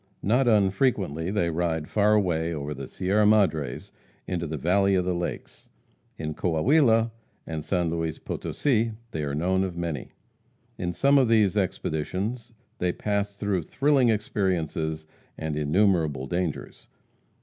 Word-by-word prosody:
Not 120 +6 +2
unfrequently 95 - +2
they 90 -4 0
ride 80 -2 -1
far 105 0 +3
away 85 -5 +1
over 75 0 -4
the 70 -1 -7
Sierra 100 +3 +1
Madres 85 - +1 0.3
into 85 -2 -3
the 80 +1 -4
valley 95 +6 +2
of 90 -1 +1
the 90 - 0
lakes; 85 0 -5 0.5
in 75 -1 -4
Coahuila 115 - +3 0.3
and 80 -2 -5
San 85 -1 0
Luis 80 -2 -2
Potosi, 115 -5 -1 0.2
they 80 - -3
are 70 -1 -2
known 95 +5 +1
of 90 -3 -4
many. 85 -6 -4 0.7
In 90 -1 -1
some 140 +9 +4
of 130 - +3
these 110 -4 +3
expeditions 100 +5 -2 0.3
they 90 0 +1
pass 100 +1 -2
through 100 -3 -1
thrilling 135 - +2
experiences 85 -7 -1 0.3
and 80 -2 -3
innumerable 75 -3 +1
dangers. 85 +2 -4
90 Hz, 140 wpm, -26 LUFS, 80-105 Hz, 0.7 s, some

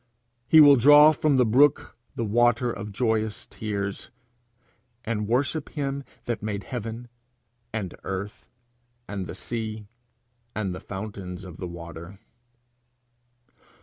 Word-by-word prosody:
He 160 - +7
will 145 -2 +9
draw 145 +4 +8
from 150 -2 +1
the 125 - +4
brook 135 +6 +3 0.2
the 115 - -2
water 120 +2 +2
of 100 0 -6
joyous 110 -1 -1
tears, 100 -2 -4 1.0
'and 105 -2 -2
worship 140 +6 0
him 140 -1 -3 0.2
that 120 -2 -3
made 105 -1 -3
heaven, 120 0 -6 0.6
and 105 -5 -4
earth, 100 +3 -5 0.6
and 100 -3 -5
the - - -7
sea, 110 +2 -5 0.7
and 100 -4 -2
the 90 - -6
fountains 95 -2 -7
of 90 -3 -11
waters.' 85 +1 -8
110 Hz, 115 wpm, -25 LUFS, 100-125 Hz, 1.0 s, will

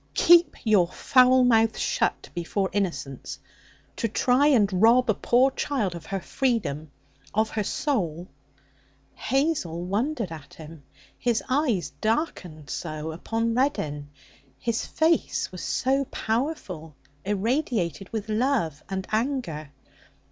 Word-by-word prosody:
'Keep 345 0 +6
your 210 -7 +4
foul 255 +6 +4
mouth 225 -2 +3
shut - - -1
before 190 +3 -2
innocence! 170 -9 -3 0.6
To 230 - 0
try 250 +5 +3
and 200 -9 +3
rob 235 +1 +5
a - - +1
poor 250 +6 +3
child 250 -10 -1
of 170 -2 -9
her 195 - -2
freedom, 195 - -1 0.5
of 220 +1 +1
her 215 - -1
soul 180 - -2 0.5
' 140 0 -36 0.2
Hazel 265 - 0
wondered 225 - -1
at 155 -4 -10
him. 160 -1 -11 0.4
His 235 -2 0
eyes 245 - +1
darkened 185 - -2
so 155 -1 -4
upon 225 +7 -2
Reddin, 150 - -1 0.5
his 230 - -2
face 320 +1 +1
was - - -8
so 270 +2 0
powerful, 220 - -3 0.3
irradiated 205 - -1
with 220 -1 -4
love 215 - 0
and 190 -1 -3
anger. 215 - -2
215 Hz, 120 wpm, -25 LUFS, 170-255 Hz, 0.6 s, Keep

